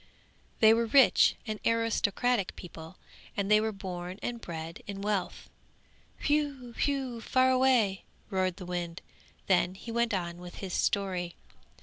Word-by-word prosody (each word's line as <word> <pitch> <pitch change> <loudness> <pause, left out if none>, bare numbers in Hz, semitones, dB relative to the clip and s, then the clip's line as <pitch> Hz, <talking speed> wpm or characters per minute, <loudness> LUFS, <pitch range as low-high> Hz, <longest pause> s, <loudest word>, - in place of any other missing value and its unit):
'They 220 0 +8
were 230 0 +1
rich 265 +3 +6
and 215 -2 -4
aristocratic 230 -1 +1
people, 165 0 -10 0.4
and 200 0 0
they 215 0 +6
were 220 0 0
born 185 -2 -6
and 235 -1 -3
bred 165 -1 -6
in 200 -1 -5
wealth! 200 -2 -2 0.7
Whew! 285 -5 0
whew! 265 -3 -1
fare 255 +2 +3
away!' 250 -7 +3 0.3
roared 185 -2 0
the 185 - -9
wind, 175 -1 -4 0.4
then 180 -1 +2
he 230 +4 -8
went 235 +1 +1
on 170 -2 -4
with 180 0 -10
his 190 -3 -6
story. 185 -4 0
200 Hz, 140 wpm, -30 LUFS, 180-235 Hz, 0.7 s, They